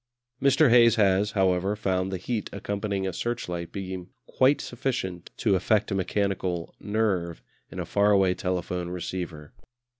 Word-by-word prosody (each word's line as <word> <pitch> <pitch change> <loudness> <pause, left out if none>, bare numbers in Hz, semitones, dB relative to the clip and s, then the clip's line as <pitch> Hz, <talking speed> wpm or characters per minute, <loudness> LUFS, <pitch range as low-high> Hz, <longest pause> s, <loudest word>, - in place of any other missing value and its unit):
Mr. 140 0 +5
Hayes 115 -2 +7
has, 100 -1 +2
however, 95 0 +2
found 95 -2 -1
the 95 - -2
heat 105 +3 -3
accompanying 100 -1 -3
a 95 - -2
searchlight 90 -6 -3
beam 95 -2 -6 0.2
quite 135 +3 +3
sufficient 120 -9 -3
to 105 - +2
affect 105 +3 +1
a - - +1
mechanical 95 -2 -1
"nerve" 100 -6 -1 0.3
in - - -8
a - - -2
far 100 0 +2
away 95 -3 +4
telephone 90 -1 -3
receiver. 90 -4 -5
95 Hz, 145 wpm, -26 LUFS, 90-105 Hz, 0.3 s, Hayes